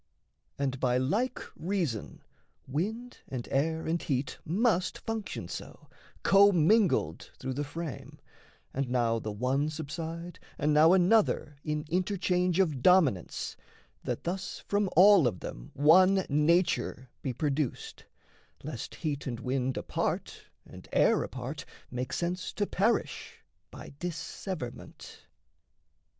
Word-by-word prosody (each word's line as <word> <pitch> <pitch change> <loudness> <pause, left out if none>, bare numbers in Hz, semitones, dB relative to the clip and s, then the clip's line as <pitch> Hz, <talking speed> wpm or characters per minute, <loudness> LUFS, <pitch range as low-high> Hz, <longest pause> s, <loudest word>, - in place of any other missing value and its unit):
And 135 -2 -1
by 125 -2 +2
like 210 - 0 0.2
reason 170 - -3 0.4
wind 220 - -3
and 125 -3 -5
air 160 +4 0
and 165 +1 0
heat 135 -2 -2
Must 185 +1 +1
function 225 -2 -5
so, - - -9 0.3
commingled 195 - +4
through 130 - -4
the 145 +3 -2
frame, 155 0 -7 0.6
And 135 -1 -2
now 120 -2 +1
the 110 - -4
one 130 +7 0
subside 165 +3 -6 0.2
and 150 +1 +1
now 155 +3 +7
another 185 -5 +3
In 150 0 -2
interchange 180 0 +1
of 155 -9 +1
dominance, 150 - +3 0.5
that - - -3
thus 185 +3 -4
From 205 -1 +1
all 190 -5 +8
of 95 -7 -2
them - - -7
one 185 +6 +5
nature 150 -5 +1
be 135 - -2
produced, 140 +1 -2 0.6
Lest - - -6
heat 150 -2 -3
and 120 -3 -3
wind 130 +1 -1
apart, - - -3 0.2
and - - -13
air - - +4
apart, 130 +3 -5 0.3
Make 125 +1 -3
sense 175 +4 -2
to 205 - 0
perish, 215 +4 -1 0.3
by - - -11
disseverment. 175 -4 -6
155 Hz, 120 wpm, -30 LUFS, 130-185 Hz, 0.6 s, all